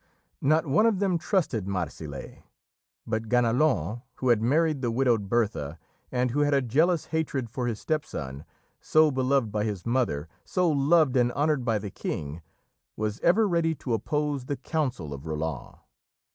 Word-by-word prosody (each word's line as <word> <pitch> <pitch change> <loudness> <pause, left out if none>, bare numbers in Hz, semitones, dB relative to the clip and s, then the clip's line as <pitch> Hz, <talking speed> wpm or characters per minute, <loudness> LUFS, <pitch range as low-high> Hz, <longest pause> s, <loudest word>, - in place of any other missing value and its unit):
Not 155 +3 +3
one 160 +11 +4
of 220 -4 +2
them 185 -3 +1
trusted 150 - 0
Marsile, 80 -7 -5 0.6
but 110 -1 -3
Ganelon, 120 - +2
who 130 - -1
had 115 -3 +4
married 150 +4 +2
the 120 - 0
widowed 115 -4 +1
Bertha 100 -10 0 0.3
and 125 -1 0
who 145 - 0
had 145 -1 +3
a 140 - +3
jealous 155 +8 +2
hatred 140 -7 -1
for 125 0 -2
his 110 -3 -2
step 155 -1 -1
son 70 - -6 0.4
so 155 -1 +4
beloved 130 -3 +1
by 105 0 0
his 105 -4 -3
mother, 115 - 0 0.2
so 180 -1 +1
loved 150 -1 +3
and 120 -1 +3
honoured 145 -2 +1
by 115 -3 +1
the 100 -1 -6
King 75 0 -5 0.6
was 110 0 -2
ever 205 +6 +4
ready 165 -3 +1
to 125 -4 -4
oppose 145 +4 -1
the 140 +1 -3
counsel 125 - -2
of 70 +3 -8
Roland. 75 -3 -4
125 Hz, 165 wpm, -27 LUFS, 105-150 Hz, 0.6 s, one